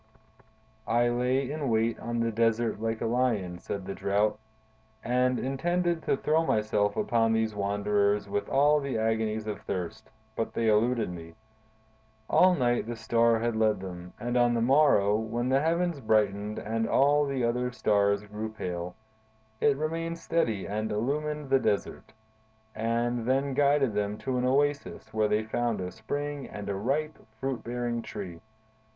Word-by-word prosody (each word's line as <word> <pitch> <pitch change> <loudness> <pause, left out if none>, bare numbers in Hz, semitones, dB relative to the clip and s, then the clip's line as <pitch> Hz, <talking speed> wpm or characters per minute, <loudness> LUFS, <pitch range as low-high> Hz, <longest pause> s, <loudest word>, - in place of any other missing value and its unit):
"I 120 +1 +3
lay 125 +3 0
in 150 -3 -2
wait 115 0 +1
on 120 0 -2
the 115 0 0
desert 115 0 +1
like 115 0 -2
a - - 0
lion," 115 -7 0
said 95 +1 -5
the 100 - -4
Drought, 105 +2 0 0.6
"and 125 +1 +2
intended 170 +6 0
to 140 - 0
throw 155 +3 +2
myself 105 -6 +1
upon 115 -1 +2
these 110 -1 0
wanderers 100 0 +1
with 100 +1 -2
all 145 +2 +4
the 140 -4 -3
agonies 110 -1 0
of 105 -2 -5
thirst, 95 +5 -5 0.3
but 115 - -3
they 115 -1 +2
eluded 115 0 +2
me. 85 -1 -9 0.9
All 185 0 +5
night 120 -5 +1
the 120 - -4
Star 115 0 +2
had 115 0 -1
led 110 -2 +2
them, 90 -1 -8
and 120 +3 -3
on 120 -1 +3
the - - +1
morrow, 120 -6 +4
when 115 +3 -2
the 135 +1 +3
heavens 170 0 0
brightened 105 -3 +1
and 115 +1 -2
all 145 +1 +4
the 135 -3 -1
other 125 +1 0
stars 100 -3 +2
grew 105 +1 -5
pale, 90 -4 -5 0.6
it 140 -2 +3
remained 165 +2 -2
steady 165 - -1
and 110 +2 -2
illumined 145 +6 -2
the 135 - +5
desert, 105 -1 -2 0.6
and 115 +1 -1
then 135 +1 +1
guided 140 -3 +3
them 105 0 -1
to 130 +1 -2
an 125 - 0
oasis 140 -4 0
where 110 0 +2
they 105 +1 +1
found 115 0 -1
a 90 0 -4
spring 145 +6 -4
and 100 -1 -7
a 100 - -1
ripe, 140 +9 -1 0.2
fruit 135 -1 -3
bearing 120 0 -2
tree. 95 -7 -7
115 Hz, 160 wpm, -28 LUFS, 105-135 Hz, 0.9 s, All